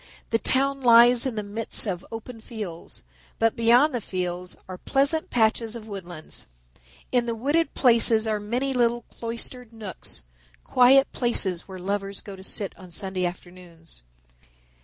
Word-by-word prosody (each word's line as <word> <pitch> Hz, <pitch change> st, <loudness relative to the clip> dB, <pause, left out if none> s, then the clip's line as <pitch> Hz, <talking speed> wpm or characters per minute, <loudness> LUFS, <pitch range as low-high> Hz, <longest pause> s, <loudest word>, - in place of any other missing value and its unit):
The 225 Hz, -, +2 dB
town 275 Hz, +2 st, +2 dB
lies 240 Hz, +1 st, +6 dB
in 250 Hz, -, -4 dB
the 210 Hz, -, -3 dB
midst 215 Hz, +4 st, -1 dB
of 185 Hz, -3 st, -3 dB
open 225 Hz, +1 st, -8 dB
fields, 205 Hz, -, -7 dB, 0.3 s
but 225 Hz, -1 st, +1 dB
beyond 240 Hz, +6 st, +4 dB
the 245 Hz, -, -2 dB
fields 180 Hz, -2 st, -4 dB
are 185 Hz, -1 st, -8 dB
pleasant 280 Hz, +4 st, 0 dB
patches 225 Hz, 0 st, +1 dB
of 225 Hz, -2 st, -9 dB
woodlands. 175 Hz, -6 st, -9 dB, 0.6 s
In 245 Hz, -1 st, +1 dB
the 230 Hz, -, -2 dB
wooded 290 Hz, +7 st, 0 dB
places 230 Hz, -3 st, +4 dB
are 215 Hz, -1 st, -1 dB
many 245 Hz, +6 st, -2 dB
little 240 Hz, -1 st, +1 dB
cloistered 235 Hz, +1 st, -6 dB
nooks, 210 Hz, -, -5 dB, 0.4 s
quiet 265 Hz, +2 st, +5 dB
places 195 Hz, -8 st, +2 dB
where 190 Hz, -1 st, -9 dB
lovers 195 Hz, +1 st, -3 dB
go 200 Hz, -, -10 dB
to 190 Hz, -, -13 dB
sit 195 Hz, 0 st, -2 dB
on 185 Hz, -, -12 dB
Sunday 185 Hz, +1 st, -3 dB
afternoons. 175 Hz, -, -12 dB
225 Hz, 150 wpm, -25 LUFS, 190-245 Hz, 0.6 s, lies